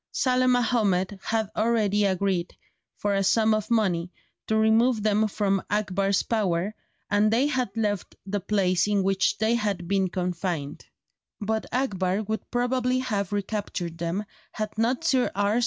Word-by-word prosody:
Saleh 255 Hz, -1 st, +2 dB
Mahomed 210 Hz, -6 st, +1 dB
had 220 Hz, -2 st, -1 dB
already 215 Hz, -2 st, +2 dB
agreed, 190 Hz, -2 st, -1 dB, 0.4 s
for 205 Hz, -1 st, -1 dB
a 195 Hz, 0 st, +1 dB
sum 220 Hz, +3 st, +3 dB
of 215 Hz, -1 st, -1 dB
money, 185 Hz, -7 st, +1 dB, 0.4 s
to 220 Hz, -, +1 dB
remove 220 Hz, +1 st, +3 dB
them 215 Hz, 0 st, +2 dB
from 195 Hz, -2 st, 0 dB
Akbar's 195 Hz, -1 st, +1 dB
power, 200 Hz, -3 st, 0 dB, 0.4 s
and 205 Hz, +1 st, +4 dB
they 235 Hz, +5 st, +3 dB
had 260 Hz, -6 st, 0 dB
left 205 Hz, -3 st, -1 dB
the 205 Hz, +1 st, -2 dB
place 185 Hz, -2 st, +1 dB
in 205 Hz, -2 st, +1 dB
which 190 Hz, 0 st, +1 dB
they 220 Hz, +1 st, +2 dB
had 205 Hz, -6 st, -1 dB
been 195 Hz, 0 st, +1 dB
confined; 175 Hz, -5 st, -3 dB, 0.5 s
but 220 Hz, +1 st, -2 dB
Akbar 200 Hz, -6 st, 0 dB
would 220 Hz, +1 st, -4 dB
probably 250 Hz, +1 st, 0 dB
have 210 Hz, -7 st, -2 dB
recaptured 195 Hz, -4 st, -3 dB
them 170 Hz, +5 st, -2 dB, 0.3 s
had 215 Hz, -1 st, -4 dB
not 235 Hz, +6 st, 0 dB
Sir 265 Hz, -7 st, +2 dB
R. 205 Hz, +3 st, +2 dB
205 Hz, 150 wpm, -26 LUFS, 190-225 Hz, 0.5 s, and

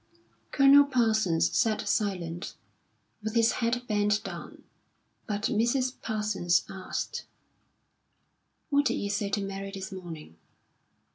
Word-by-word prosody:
Colonel 280 Hz, +1 st, +7 dB
Parsons 220 Hz, -10 st, +2 dB
sat 215 Hz, -2 st, +1 dB
silent, 180 Hz, -5 st, -2 dB, 0.7 s
with 220 Hz, +2 st, -4 dB
his 230 Hz, 0 st, +4 dB
head 240 Hz, +1 st, 0 dB
bent 210 Hz, -1 st, +1 dB
down, -, -, -8 dB, 0.6 s
but 205 Hz, 0 st, -3 dB
Mrs. 250 Hz, +3 st, +1 dB
Parsons 210 Hz, -6 st, +1 dB
asked: 190 Hz, -1 st, -5 dB, 1.5 s
"What 285 Hz, 0 st, +3 dB
did -, -, +2 dB
you 200 Hz, -, -2 dB
say 205 Hz, 0 st, -1 dB
to 200 Hz, +1 st, -1 dB
Mary 195 Hz, 0 st, -5 dB
this 195 Hz, +1 st, -7 dB
morning?" 165 Hz, -, -9 dB
210 Hz, 115 wpm, -28 LUFS, 195-230 Hz, 1.5 s, Colonel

